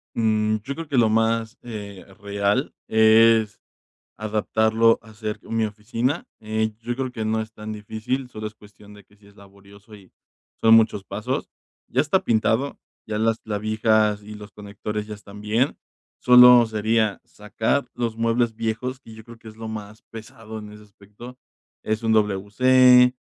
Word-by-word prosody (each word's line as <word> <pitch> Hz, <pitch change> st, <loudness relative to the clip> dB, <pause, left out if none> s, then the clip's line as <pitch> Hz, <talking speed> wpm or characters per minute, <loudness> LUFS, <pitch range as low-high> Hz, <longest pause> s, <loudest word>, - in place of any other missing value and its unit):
Mm, 110 Hz, -1 st, +1 dB
yo 140 Hz, -, -4 dB
creo 165 Hz, +1 st, -7 dB
que 140 Hz, -, -2 dB
lo 115 Hz, -3 st, +4 dB
más, 115 Hz, +1 st, 0 dB
eh, 105 Hz, -5 st, -8 dB, 0.2 s
real 100 Hz, +5 st, -1 dB
es 110 Hz, -1 st, +4 dB, 0.6 s
adaptarlo 110 Hz, +1 st, +1 dB
a 110 Hz, -1 st, -16 dB
ser 105 Hz, -1 st, -5 dB
mi 115 Hz, -1 st, -1 dB
oficina. 115 Hz, +8 st, -3 dB, 0.2 s
Eh, 110 Hz, 0 st, -2 dB
yo 120 Hz, +1 st, -4 dB
creo 130 Hz, 0 st, -3 dB
que 110 Hz, -3 st, -5 dB
no 110 Hz, 0 st, 0 dB
es 110 Hz, 0 st, -7 dB
tan 110 Hz, 0 st, -8 dB
difícil, 110 Hz, +5 st, -4 dB
solo 110 Hz, -2 st, -7 dB
es 105 Hz, -, -8 dB
cuestión 105 Hz, 0 st, -17 dB
de 105 Hz, -, -15 dB
que 105 Hz, -, -26 dB
si 100 Hz, 0 st, -23 dB
es 100 Hz, -, -20 dB
laborioso 100 Hz, +1 st, -17 dB
y 95 Hz, -3 st, -19 dB, 0.5 s
son 115 Hz, 0 st, +6 dB
muchos 110 Hz, -3 st, +3 dB
pasos. 100 Hz, +2 st, -4 dB, 0.4 s
Ya 130 Hz, -, +1 dB
está 155 Hz, +6 st, +1 dB
pintado, 115 Hz, +4 st, 0 dB, 0.3 s
ya 105 Hz, -, -3 dB
las 115 Hz, 0 st, +1 dB
clavijas 110 Hz, 0 st, 0 dB
y 105 Hz, +1 st, -10 dB
los 105 Hz, -1 st, -11 dB
conectores 105 Hz, +1 st, -6 dB
ya 105 Hz, -, -6 dB
están 105 Hz, 0 st, -13 dB
bien. 110 Hz, +6 st, 0 dB, 0.4 s
Solo 125 Hz, -1 st, +7 dB
sería 110 Hz, -1 st, 0 dB
sacar 110 Hz, +5 st, -2 dB
los 115 Hz, -2 st, -3 dB
muebles 115 Hz, 0 st, 0 dB
viejos, 120 Hz, +4 st, -4 dB
que 115 Hz, -4 st, -14 dB
yo 110 Hz, 0 st, -13 dB
creo 115 Hz, -1 st, -14 dB
que 115 Hz, -, -13 dB
es 110 Hz, -, -13 dB
lo 115 Hz, -, -8 dB
más 110 Hz, 0 st, -8 dB
pesado 110 Hz, 0 st, -10 dB
en 105 Hz, 0 st, -10 dB
ese 105 Hz, 0 st, -14 dB
aspecto. 105 Hz, +5 st, -14 dB, 0.5 s
Es 110 Hz, +1 st, -3 dB
un 110 Hz, -, +2 dB
WC, 125 Hz, +5 st, +4 dB
110 Hz, 170 wpm, -23 LUFS, 105-115 Hz, 0.6 s, Solo